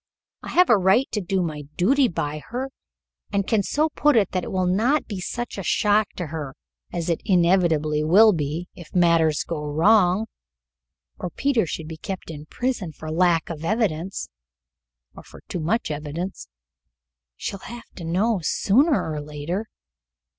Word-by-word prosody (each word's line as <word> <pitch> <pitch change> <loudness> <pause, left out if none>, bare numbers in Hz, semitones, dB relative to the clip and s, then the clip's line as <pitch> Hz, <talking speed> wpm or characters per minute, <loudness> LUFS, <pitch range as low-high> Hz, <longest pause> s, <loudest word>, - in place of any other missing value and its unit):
I - - -8
have 360 -4 +4
a 215 - +6
right 190 +8 +3
to 210 - -1
do 190 0 0
my 150 -3 -4
duty 260 +9 +4
by 155 -4 -3
her, 260 +3 -4 0.6
and 200 -1 +1
I - - -23
can 220 -2 +2
so 300 +10 0
put 295 -1 +2
it 200 -4 +2
that 185 -2 -1
it - - -6
will 185 -1 0
not 225 +12 +2
be 200 -3 -5
such 240 +2 -4
a - - -4
shock 210 +3 +2
to 175 - -4
her 145 -4 -5 0.4
as 170 -1 -3
it 170 -2 0
inevitably 170 -5 +2
will 205 +7 +6
be 160 +2 -3
if 175 -1 -13
matters 165 -3 +3
go 155 -3 -4
wrong, 180 +6 +3 0.9
or 180 - -3
Peter 250 -3 +1
should 155 +1 -5
be 160 0 -7
kept 185 0 -6
in 150 -1 -9
prison 245 -8 -2
for 155 +1 -7
lack 170 -1 +2
of 160 -1 -7
evidence 185 - -1 0.9
or - - -10
for - - -15
too 180 - -4
much 175 +4 -1
evidence. 150 +5 -5 0.9
She'll 195 - -5
have 240 0 -9
to 175 - -9
know 190 +6 +1
sooner 265 - +2
or 150 - -3
later." 150 +8 -4
180 Hz, 170 wpm, -23 LUFS, 160-215 Hz, 0.9 s, a